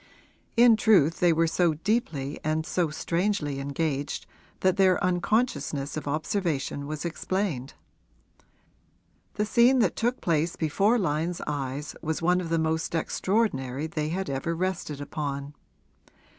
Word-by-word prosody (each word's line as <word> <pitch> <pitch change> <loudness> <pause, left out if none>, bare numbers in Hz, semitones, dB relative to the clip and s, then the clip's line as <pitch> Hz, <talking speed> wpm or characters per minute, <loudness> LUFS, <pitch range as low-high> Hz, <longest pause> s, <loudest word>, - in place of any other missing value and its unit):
In 235 -1 +7
truth 180 -8 +4
they 175 -1 +5
were 165 +1 +3
so 165 0 +2
deeply 155 - -1
and 155 +1 0
so 175 -2 0
strangely 165 -2 -1
engaged 140 +1 -2 0.4
that 185 -1 +3
their 190 -2 +4
unconsciousness 180 - 0
of 155 - -5
observation 155 -2 -2
was 155 +2 -4
explained. 170 -5 -2 1.6
The 210 - 0
scene 240 +4 +5
that 215 -9 +2
took 240 +2 0
place 165 0 0
before 195 +9 +2
Lyon's 170 -2 -1
eyes 145 0 -4
was 160 0 -2
one 180 +2 +2
of 170 - -5
the 165 - +1
most 160 +1 -1
extraordinary 155 - 0
they 155 -1 -2
had 190 +3 -2
ever 140 +5 -2
rested 170 -5 -3
upon. 145 -1 -4
165 Hz, 130 wpm, -27 LUFS, 145-185 Hz, 1.6 s, In